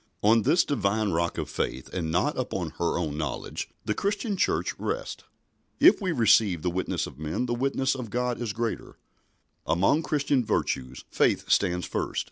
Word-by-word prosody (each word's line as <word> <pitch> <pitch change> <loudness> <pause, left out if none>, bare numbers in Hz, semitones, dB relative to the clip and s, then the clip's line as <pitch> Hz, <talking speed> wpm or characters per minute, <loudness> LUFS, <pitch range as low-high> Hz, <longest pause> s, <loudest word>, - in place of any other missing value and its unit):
On 110 +2 +5
this 170 - +3
Divine 110 -5 0
rock 85 +1 -1
of - - -2
faith, 65 - -3
and 85 -3 -2
not 145 - +1
upon 95 -10 -3
her 85 - +1
own 75 -4 -2
knowledge, 75 -4 -4 0.2
the 105 - +1
Christian 205 - -1
Church - - 0
rests. - - -4 0.5
"If - - +6
we 185 -3 0
receive 110 - +3
the 90 - 0
witness 95 +2 -1
of 70 - -11
men, 80 +10 -2
the 120 - -1
witness 135 +2 0
of 125 -4 -6
God 125 +2 -1
is 115 -3 -2
greater." 115 +2 -4 0.7
Among 95 - +3
Christian 145 -4 +1
virtues 65 - -2
faith - - +1
stands 90 -2 +2
first. - - -2
110 Hz, 170 wpm, -27 LUFS, 85-130 Hz, 0.7 s, If